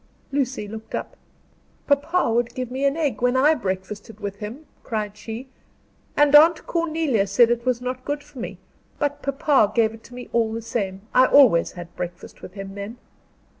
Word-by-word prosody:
Lucy 265 -6 -1
looked 220 +1 -7
up. - - -5 0.7
"Papa 285 0 +2
would 240 +1 0
give 255 -1 -4
me 265 +2 -1
an 280 +2 +2
egg 290 -9 -1
when 245 +1 +2
I 295 +4 +5
breakfasted 200 -1 -5
with 200 -1 -5
him," 230 +10 -7 0.2
cried 210 -3 -3
she, 225 +4 -7 0.7
"and 295 -1 +4
Aunt 320 +2 +7
Cornelia 315 - 0
said 230 +4 +5
it 240 +1 -1
was 250 -1 +1
not 255 +1 -4
good 290 +1 -3
for 290 -3 -13
me, 235 - -6 0.4
but 290 -1 -1
papa 275 -5 +2
gave 225 -2 +3
it 225 - -13
to 245 - -12
me 250 - -8
all 225 -2 +2
the 230 - -3
same. 195 -4 -3
I 255 0 +6
always 250 -12 +5
had 175 -1 -10
breakfast 175 -1 -7
with 185 - -10
him 195 -1 -7
then." 200 +4 -7
240 Hz, 185 wpm, -23 LUFS, 210-280 Hz, 0.7 s, Aunt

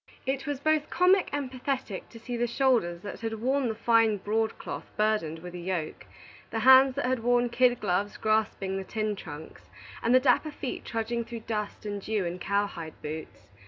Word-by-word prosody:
It 270 +2 -2
was 290 -2 -2
both 310 +1 +1
comic 365 +1 +4
and 280 -3 -3
pathetic 255 -6 -3
to 230 - -12
see 240 +2 -5
the 240 0 0
shoulders 235 -10 +1
that 205 - -6
had 225 -1 -2
worn 260 +4 0
the 220 - -2
fine 225 -2 +3
broadcloth 220 +3 -2
burdened 210 -7 +1
with 175 +2 -9
a 180 - -6
yoke, 175 -3 -4 0.4
the 225 - -2
hands 260 +2 +7
that 280 - -1
had 255 0 +1
worn 245 +1 +3
kid 245 0 +3
gloves 200 +1 -1
grasping 215 -3 0
the 195 - -3
tin 215 +1 -2
trunks, 155 -4 -10 0.3
and 240 +2 +3
the - - +8
dapper 255 +4 +3
feet 280 -3 -5
trudging 235 +1 -2
through 230 0 -7
dust 215 -2 -4
and 205 -1 -3
dew 210 -2 -1
in 175 +1 -4
cow 200 +2 +1
hide 165 -5 -8
boots. 150 -8 -7
225 Hz, 195 wpm, -28 LUFS, 200-255 Hz, 0.4 s, the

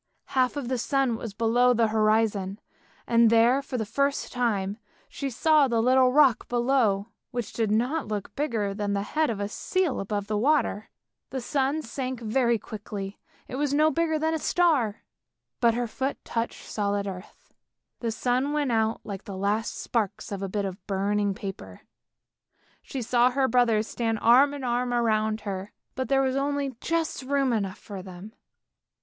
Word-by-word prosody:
Half 255 +1 +2
of 275 -4 -3
the 255 0 -1
sun 270 -1 +1
was 225 -2 -7
below 240 +3 +3
the 230 -1 +3
horizon, 215 -3 +1 0.5
and 230 -1 +5
there 230 +4 +4
for 270 -2 -5
the 220 - -2
first 280 +6 -1
time 210 -4 -1 0.3
she 275 - -4
saw 300 +3 +4
the 235 -2 +1
little 255 +2 +4
rock 275 -3 +4
below, 240 -4 +1 0.2
which 240 -3 -4
did 225 -2 0
not 245 +8 0
look 210 -2 -4
bigger 225 -9 -1
than 205 0 -2
the 200 0 0
head 305 +7 0
of 220 -3 -3
a 200 - -1
seal 360 - -1
above 205 0 -2
the 210 0 -1
water. 265 -5 +1 0.4
The 265 - -3
sun 275 +4 0
sank 260 -4 -4
very 235 +1 +1
quickly, 205 -1 -7 0.3
it 255 - -5
was 285 0 0
no 310 +1 +4
bigger 325 -1 +1
than 320 +1 0
a 320 - -1
star, 295 -13 +1 0.6
but 235 -3 +3
her 245 0 0
foot 265 +4 -3
touched 230 0 -3
solid 205 -1 -1
earth. 185 -2 -9 0.5
The 235 - -2
sun 255 +5 0
went 290 -4 0
out 220 0 +1
like 200 -3 -7
the 195 -2 -6
last 205 +3 -1
sparks 215 -3 -2
of 200 -1 -4
a 195 - -3
bit 200 +1 -1
of 190 +1 -6
burning 200 0 0
paper; 185 - -8 1.0
she 260 -3 -5
saw 240 +2 +4
her 265 +1 +1
brothers 230 -3 +3
stand 225 -2 -1
arm 270 +5 +6
in 280 - -7
arm 245 0 0
around 220 -2 +1
her, 195 -1 -5 0.2
but 260 0 -3
there 270 0 +3
was 260 0 0
only 280 -1 -1
just 330 -3 -1
room 270 -1 +1
enough 200 -4 -2
for 200 -3 -8
them. 185 +3 -10
235 Hz, 175 wpm, -26 LUFS, 210-270 Hz, 1.0 s, arm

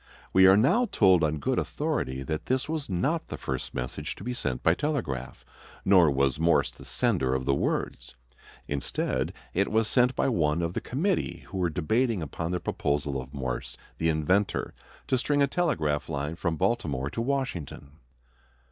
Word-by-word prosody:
We 95 0 +7
are 95 +1 +7
now 180 - +3
told 95 -5 +5
on 80 0 +1
good 70 - 0
authority 65 +1 -2
that 75 +3 -4
this 130 +1 0
was 155 -5 -3
not 135 - 0
the - - -6
first 65 -1 -4
message 65 0 -4
to - - -11
be 125 +3 -3
sent 65 - -3
by 80 - +5
telegraph, 85 - -3 0.4
nor 90 -5 +6
was 70 0 +1
Morse 85 +1 +3
the - - -14
sender 65 -1 +1
of 65 0 -2
the 70 - +2
words. - - -2 0.5
Instead, 70 -1 -1 0.2
it 100 +2 +1
was 110 0 +2
sent 125 +3 +3
by - - +1
one 85 - +1
of 85 +1 -2
the - - -2
committee 175 +10 -1
who 95 - -4
were 90 -1 +2
debating 105 +5 0
upon 80 +3 -4
the 90 0 -1
proposal 70 -4 -1
of 65 +1 -11
Morse, 65 -4 -4 0.2
the 80 - +2
inventor, 90 +6 +1 0.3
to 130 - +1
string 145 +2 +2
a - - +6
telegraph 85 - 0
line 75 +3 -3
from 85 -2 -2
Baltimore 80 - 0
to 115 - -3
Washington. 90 - -3
85 Hz, 175 wpm, -27 LUFS, 70-120 Hz, 0.5 s, We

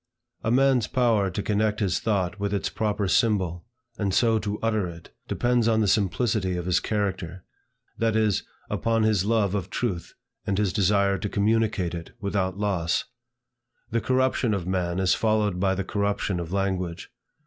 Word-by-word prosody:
A - - 0
man's 130 -2 +3
power 115 -6 +2
to 95 +3 -4
connect 105 0 0
his 95 -4 +1
thought 100 -3 -1
with 100 0 -1
its 100 - -1
proper 105 -2 -1
symbol, 95 -4 +1 0.3
and 100 -3 0
so 115 0 +3
to 105 0 -3
utter 110 -4 0
it, 85 -1 -11
depends 120 -2 +1
on 110 -1 +3
the 105 - +2
simplicity 100 -1 +1
of 90 - -4
his 90 -1 +2
character, 95 -4 -3 0.6
that 115 -1 +1
is, 110 -3 +2 0.3
upon 115 -1 0
his 105 -3 +2
love 105 -3 +2
of 95 -3 -2
truth, 95 -8 -3 0.3
and 100 - 0
his 100 -3 +1
desire 100 -1 +2
to 105 - -3
communicate 105 -4 +1
it 85 -1 -7
without 100 -2 -1
loss. 95 -5 0 0.9
The 115 0 +1
corruption 130 -3 +1
of 95 -4 -3
man 90 -1 -1
is 95 -2 +3
followed 105 -4 +1
by 95 0 +2
the 100 - -2
corruption 100 -2 -1
of 85 -1 -5
language. 95 -3 -2
100 Hz, 170 wpm, -25 LUFS, 95-110 Hz, 0.9 s, man's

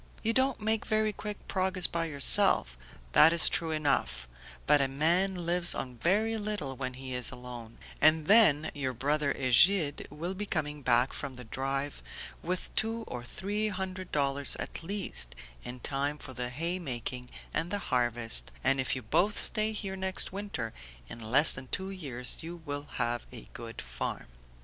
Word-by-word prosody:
"You 225 +1 +1
don't 260 +1 +1
make 220 +1 0
very 215 -1 +1
quick 210 0 -7
progress 185 -1 +2
by 170 0 0
yourself, 140 - +5 0.4
that 155 - +7
is 170 -1 +5
true 165 - 0
enough, 130 - 0 0.4
but 145 - +5
a 135 - +3
man 175 +6 +1
lives 175 0 +3
on 125 -2 -6
very 215 - +1
little 205 -11 -3
when 130 -1 -4
he 130 0 -6
is 125 -1 0
alone, 125 -2 -9 0.2
and 155 0 +5
then 160 -8 +5
your 130 -3 -3
brother 145 +3 0
Egide 145 +5 +3
will 165 +6 -4
be 205 +2 -5
coming 150 -4 -2
back 125 0 +2
from 135 -2 -5
the 125 - -9
drive 135 +4 -3 0.4
with 180 +1 -4
two 225 +1 -1
or 120 - -7
three 205 - -2
hundred 185 -2 -5
dollars 140 -1 0
at - - -6
least, 165 - -1 0.3
in 125 +1 -7
time 140 +3 -2
for 130 - -9
the 125 -1 -3
hay 165 +8 -2
making 125 -4 -5 0.2
and 165 - -1
the 205 - -1 0.2
harvest, 120 - +2
and, 135 0 +3
if 130 - 0
you 130 - -5
both 195 - +1
stay 215 0 +2
here 200 -3 -4
next 190 0 0
winter, 195 - -4 0.4
in 115 - -7
less 125 +7 +5
than 130 0 -7
two 190 +8 -3
years 135 -10 -4
you 170 0 -8
will 145 0 -5
have 120 0 -2
a 120 -3 -10
good 115 -1 -8
farm." - - -5
150 Hz, 175 wpm, -30 LUFS, 125-190 Hz, 0.4 s, that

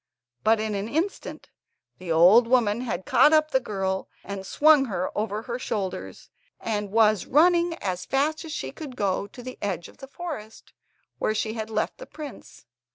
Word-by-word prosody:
But 220 0 +4
in 215 0 -2
an 200 +2 -3
instant 335 +9 -3 0.5
the 180 -2 -5
old 185 +9 +6
woman 235 -3 +2
had 200 -7 -4
caught 265 +5 +5
up 310 0 +4
the 265 - +3
girl 195 -5 -3
and 195 0 -6
swung 300 -2 +5
her 185 -6 -3
over 210 0 -2
her 240 +1 -4
shoulders, 185 - -5 0.3
and 210 -2 -2
was 215 -1 +3
running 340 +3 +4
as 185 - -4
fast 300 +4 0
as 320 - -8
she - - -4
could 290 -5 -9
go 200 -2 -1
to 245 +4 -12
the 255 +1 -8
edge 190 -4 -3
of - - -19
the 270 - -10
forest, 275 -9 -8 0.5
where 215 - 0
she 220 0 -1
had 220 -1 -5
left 215 -1 -2
the - - -9
prince. 300 -2 -10
220 Hz, 180 wpm, -25 LUFS, 200-280 Hz, 0.5 s, old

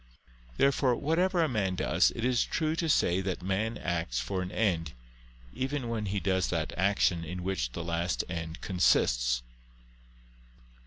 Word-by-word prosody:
Therefore 135 -2 +3
whatever 170 +6 +1
a - - +2
man 100 -8 -1
does, - - +3
it 115 - -2
is 125 -1 +3
true 155 -1 -1
to 165 -1 -1
say 90 - +3
that 95 -2 -3
man 105 +5 -1
acts 80 -8 -2
for 90 +10 -2
an 90 0 -5
end, 85 -9 0 0.6
even 130 -2 -2
when 110 -3 -2
he 100 +1 -1
does 95 -1 +1
that 85 -2 -2
action 95 -2 +2
in 90 +2 -5
which 90 -11 -2
the 85 - -4
last 85 +1 -1
end 80 -2 -5
consists. - - +2
95 Hz, 155 wpm, -29 LUFS, 85-115 Hz, 0.6 s, Therefore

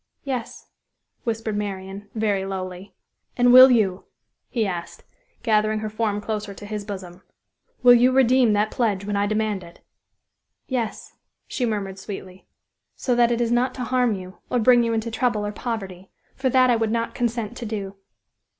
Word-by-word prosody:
"Yes," 255 -4 -5 0.6
whispered 225 -2 -2
Marian, 200 0 -5
very 210 -3 0
lowly. 185 0 -6 0.4
"And 245 0 +5
will 255 +1 +11
you," 200 -6 +1 0.4
he 230 -3 0
asked, 175 -3 -5 0.4
gathering 215 -1 +2
her 215 -1 -4
form 215 -1 -1
closer 210 -2 -4
to 205 - -10
his 210 0 -5
bosom, 185 -3 -8 0.6
"will 245 0 +9
you 245 +2 +5
redeem 255 -3 +4
that 210 +1 +1
pledge 205 -5 0
when 205 0 -2
I 200 0 +1
demand 215 -2 -1
it?" 170 0 -15 0.8
"Yes," 240 -5 -4 0.3
she 245 - -2
murmured 195 -3 -3
sweetly, 190 -2 -9 0.5
"so 250 - -1
that 240 0 +3
it 240 0 0
is 235 -1 0
not 245 +2 +1
to 255 - -4
harm 250 -2 +1
you, 185 0 -10
or 250 - +1
bring 245 +1 +5
you 230 -1 0
into 225 +1 -2
trouble 225 -3 0
or 205 - -3
poverty; 195 -5 -6 0.3
for 265 0 0
that 255 0 +4
I - - +4
would 225 -1 0
not 230 0 -1
consent 235 -1 -2
to 235 - -5
do!" 200 -3 -5
215 Hz, 170 wpm, -23 LUFS, 200-240 Hz, 0.8 s, will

